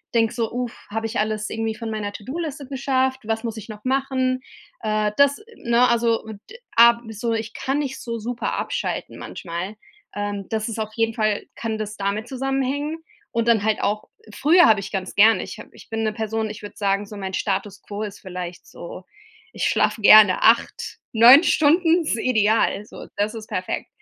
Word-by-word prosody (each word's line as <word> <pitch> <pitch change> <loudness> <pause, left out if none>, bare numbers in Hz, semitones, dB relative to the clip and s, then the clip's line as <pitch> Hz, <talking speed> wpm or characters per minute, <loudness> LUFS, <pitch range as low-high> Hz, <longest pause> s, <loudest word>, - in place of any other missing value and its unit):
denke 225 -1 +3
so: 230 -2 -2
„Uff, 245 -1 -4
habe 225 +2 -3
ich 225 +2 -2
alles 215 0 -1
irgendwie 225 0 -2
von 225 0 -5
meiner 210 -2 -3
To-do-Liste 280 +7 -6
geschafft, 265 -1 0
was 225 +1 -2
muss 230 -1 -4
ich 220 - -9
noch 210 -1 -9
machen?“ 260 -1 0 0.4
Äh, 215 -1 0
das, 280 0 +4 0.2
ne, 235 +1 +3
also 235 -1 +1 0.3
d 470 - -11 0.2
a 235 0 +7
so, 230 +2 -2
ich 220 -1 -3
kann 270 +1 -2
nicht 275 -3 -3
so 230 -1 -4
super 235 +2 -3
abschalten - - -3
manchmal. 175 +3 -6 0.4
Ähm, 205 -1 -4
das 220 0 -2
ist 225 0 -5
auf 215 0 -3
jeden 225 -1 +1
Fall 215 -2 0
kann 225 -1 -3
das 215 0 -5
damit 200 +3 -2
zusammenhängen 270 +3 -2 0.3
und 230 0 -1
dann 230 -3 +4
halt 220 0 +1
auch 210 +1 -1 0.2
früher 335 - +5
habe 215 -2 +5
ich 195 - -7
ganz 190 -2 -4
gerne 220 +2 +5
ich - - -9
hab - - -10
ich - - -16
bin 225 0 -2
'ne 215 -1 0
Person, 220 0 -2
ich 210 - -9
würde 205 - -9
sagen, 200 -1 0
so 210 - -10
mein 190 -2 -4
Status 200 0 -2
quo 205 0 -6
ist 210 -2 -5
vielleicht 180 -2 -7
so, 175 +2 -10 0.5
ich - - -2
schlafe 220 - +1
gerne 205 -2 +8
8, 230 +1 +2 0.2
9 245 +8 +9
Stunden 330 +3 +4
ist 300 -8 -1
ideal. 220 -3 +2
So, - - -11
das 210 +2 -1
ist 220 -1 -7
perfekt. 185 -3 -3
225 Hz, 190 wpm, -22 LUFS, 210-250 Hz, 0.5 s, 9